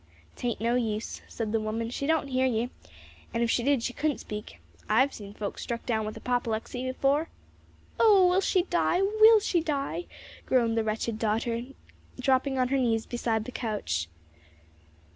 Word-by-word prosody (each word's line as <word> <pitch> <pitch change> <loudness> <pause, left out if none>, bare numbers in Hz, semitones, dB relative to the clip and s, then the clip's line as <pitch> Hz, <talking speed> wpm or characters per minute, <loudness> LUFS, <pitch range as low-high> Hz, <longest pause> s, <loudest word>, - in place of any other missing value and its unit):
"'Tain't 245 -3 -2
no 230 +2 +1
use," 225 -3 -2
said 220 -2 -4
the 225 - +1
woman, 225 +2 -3
"she 280 +3 -3
don't 315 -3 +1
hear 260 0 +2
ye. 240 0 -1 0.6
An' 230 - +1
if 230 - +1
she - - +2
did 270 -1 +2
she 245 - -2
couldn't 295 +1 0
speak. 210 0 -8 0.3
I've 270 +1 +4
seen 205 -1 -9
folks 205 -2 -5
struck 235 -1 -4
down 220 -3 0
with 215 - -6
apoplexy 245 +1 -2
afore." 275 +5 +1 0.7
"Oh, 405 -5 +6
will 365 +2 +3
she 370 -2 +2
die? 355 +1 +1
will 435 +2 +6
she 365 -4 +1
die?" 305 +2 -2 0.4
groaned 235 -3 +2
the 225 - +1
wretched 220 +1 -2
daughter, 230 +2 -1 0.5
dropping 265 +1 +2
on 255 -1 +2
her 275 - +2
knees 230 -4 +1
beside 225 -2 -1
the 255 - -6
couch. 205 - -2
245 Hz, 170 wpm, -28 LUFS, 225-280 Hz, 0.7 s, Oh